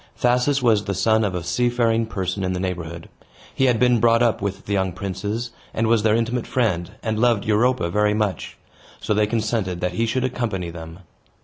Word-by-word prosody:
Thasus 125 +3 +2
was 110 -4 +3
the 100 -2 -2
son 110 +3 +2
of 100 -3 -1
a 90 - -3
seafaring 115 +1 +1
person 95 -2 -3
in 95 0 -1
the 90 - -3
neighborhood; 85 -3 -5 0.5
he 135 - +1
had 120 -4 +2
been 125 -1 +4
brought 115 +1 +4
up 115 -4 +1
with 100 -1 -4
the 100 - -3
young 95 -2 0
princes, 100 +5 -4 0.2
and 115 - +1
was 115 -1 +3
their 110 0 +3
intimate 120 +1 -1
friend, 95 -9 0
and 110 -1 -1
loved 120 -3 +2
Europa 110 -1 +2
very 105 +2 +2
much; 105 -6 -2 0.4
so - - -1
they 105 0 +2
consented 110 -5 -1
that 90 0 -1
he 115 +5 0
should 130 +3 -1
accompany 110 -9 -2
them. 80 +2 -10
110 Hz, 200 wpm, -22 LUFS, 95-120 Hz, 0.5 s, been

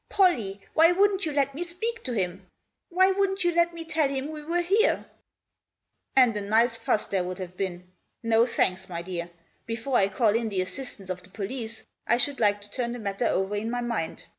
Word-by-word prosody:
" - - -48
Pollie, 230 - +2
why 330 +2 +6
wouldn't 390 -1 +2
you - - -1
let 280 -1 +1
me 320 +6 -3
speak 440 +7 -4
to 255 - -2
him? 185 -2 -2 0.4
Why 375 +2 +4
wouldn't 385 -1 +1
you 350 - +3
let 340 0 +3
me 335 -1 -8
tell 315 -3 +1
him 275 +2 -3
we 305 -1 -7
were 335 +4 0
here? 405 +7 +2 0.4
" - - -60
" - - -50
And 250 -4 +5
a 210 - -2
nice 225 +4 +3
fuss 215 -2 0
there'd 185 -2 -2
have 180 -1 -7
been. 180 -1 -4 0.4
No, 230 +1 +4
thanks, 190 -4 0
my 170 -1 -4
dear. 175 -1 -4 0.4
Before 230 +3 -2
I 195 - +3
call 220 +3 +2
in 230 -1 0
the 190 -3 0
assistance 195 -1 -4
of 180 0 -5
the 180 - -19
police 225 +3 -5 0.2
I 235 - +4
should 275 +3 +1
like 205 -2 +2
to 205 0 -11
turn 240 0 -2
the - - -5
matter 210 +1 -1
over 190 +2 0
in 215 +2 -2
my 245 +1 -2
mind. 235 -9 -3
235 Hz, 220 wpm, -27 LUFS, 195-320 Hz, 0.4 s, why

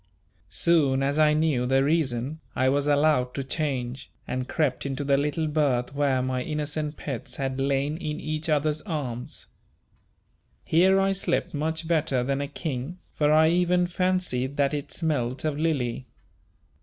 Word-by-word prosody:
Soon 140 -6 +3
as 140 +2 0
I 150 -1 +5
knew 150 -6 +1
the 135 +1 +3
reason, 145 -2 0 0.2
I 130 0 +3
was 145 +1 +1
allowed 145 -4 +2
to 135 - -2
change, 130 -3 -3 0.2
and 130 0 -3
crept 145 -5 0
into 140 0 -3
the 140 0 +3
little 150 +3 0
berth 140 -5 0
where 140 -3 +1
my 130 0 -1
innocent 150 +1 -3
pets 135 -6 -6
had 135 -1 -2
lain 140 +2 0
in 150 -3 -4
each 155 +1 -3
other's 150 0 +1
arms. 135 - -5 1.2
Here 190 +4 +4
I 195 0 +2
slept 195 0 -1
much 160 +2 -2
better 155 -6 +1
than 135 +2 -1
a 140 - -2
king, 145 +2 -5 0.2
for 150 -1 +2
I 160 +1 +5
even 180 +1 +2
fancied 175 -8 -1
that 140 0 +2
it 145 -1 -4
smelt 135 -5 -1
of 150 -1 -1
Lily. 135 -6 -1
145 Hz, 155 wpm, -26 LUFS, 130-155 Hz, 1.2 s, I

